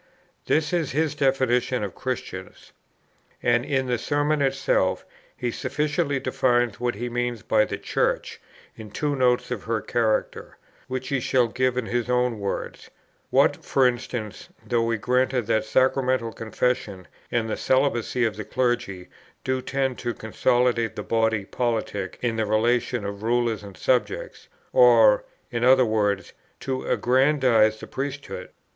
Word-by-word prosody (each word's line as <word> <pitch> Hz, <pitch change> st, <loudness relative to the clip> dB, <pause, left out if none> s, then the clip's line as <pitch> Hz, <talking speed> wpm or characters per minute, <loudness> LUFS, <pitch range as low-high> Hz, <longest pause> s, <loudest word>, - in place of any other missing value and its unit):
This 155 Hz, +2 st, +1 dB
is 165 Hz, -7 st, 0 dB
his 155 Hz, +1 st, +1 dB
definition 130 Hz, -4 st, +1 dB
of 100 Hz, -3 st, -4 dB
Christians. -, -, -6 dB, 0.7 s
And 120 Hz, 0 st, +3 dB
in 135 Hz, -1 st, 0 dB
the 125 Hz, -2 st, -1 dB
Sermon 145 Hz, +2 st, 0 dB
itself, 135 Hz, 0 st, +1 dB, 0.3 s
he 120 Hz, -1 st, -2 dB
sufficiently 145 Hz, +3 st, -1 dB
defines 120 Hz, -3 st, +1 dB
what 120 Hz, -2 st, -1 dB
he 120 Hz, +4 st, -4 dB
means 120 Hz, -1 st, -2 dB
by 110 Hz, -1 st, +3 dB
'the 100 Hz, -, -4 dB
Church,' 100 Hz, -, -1 dB, 0.3 s
in 110 Hz, -1 st, -10 dB
two 145 Hz, +7 st, -2 dB
notes 125 Hz, -2 st, +1 dB
of 120 Hz, -5 st, -4 dB
her 115 Hz, 0 st, 0 dB
character, 110 Hz, -1 st, -1 dB, 0.3 s
which 130 Hz, 0 st, -4 dB
he 140 Hz, -, +1 dB
shall 125 Hz, -1 st, +2 dB
give 125 Hz, +2 st, 0 dB
in 125 Hz, -, -1 dB
his 120 Hz, +1 st, -2 dB
own 125 Hz, -2 st, +1 dB
words: 100 Hz, -1 st, -5 dB, 0.4 s
'What, -, -, +3 dB
for 135 Hz, -, +2 dB
instance, 120 Hz, -, -3 dB, 0.2 s
though 120 Hz, -2 st, +1 dB
we 115 Hz, 0 st, 0 dB
grant 125 Hz, +1 st, +1 dB
that 110 Hz, +1 st, +1 dB
sacramental 130 Hz, -1 st, +1 dB
confession 110 Hz, -4 st, -2 dB, 0.2 s
and 115 Hz, -2 st, 0 dB
the 110 Hz, -, -2 dB
celibacy 130 Hz, -2 st, +1 dB
of 110 Hz, -2 st, -2 dB
the 105 Hz, -, -4 dB
clergy 120 Hz, -5 st, -1 dB, 0.4 s
do 130 Hz, 0 st, -1 dB
tend 135 Hz, -1 st, -2 dB
to 120 Hz, -2 st, -3 dB
consolidate 120 Hz, 0 st, +1 dB
the -, -, -5 dB
body 110 Hz, -2 st, +1 dB
politic 110 Hz, -5 st, -2 dB
in 115 Hz, -2 st, 0 dB
the 110 Hz, -1 st, 0 dB
relation 115 Hz, +1 st, +1 dB
of 100 Hz, 0 st, -5 dB
rulers 115 Hz, -1 st, 0 dB
and 100 Hz, -2 st, -11 dB
subjects, 475 Hz, -, -1 dB, 0.3 s
or, -, -, +6 dB, 0.3 s
in 120 Hz, -1 st, -2 dB
other 130 Hz, 0 st, +6 dB
words, 105 Hz, -3 st, 0 dB, 0.3 s
to 130 Hz, -1 st, -3 dB
aggrandize 125 Hz, -4 st, +3 dB
the -, -, -8 dB
priesthood? 135 Hz, -9 st, -5 dB
120 Hz, 150 wpm, -24 LUFS, 110-130 Hz, 0.7 s, or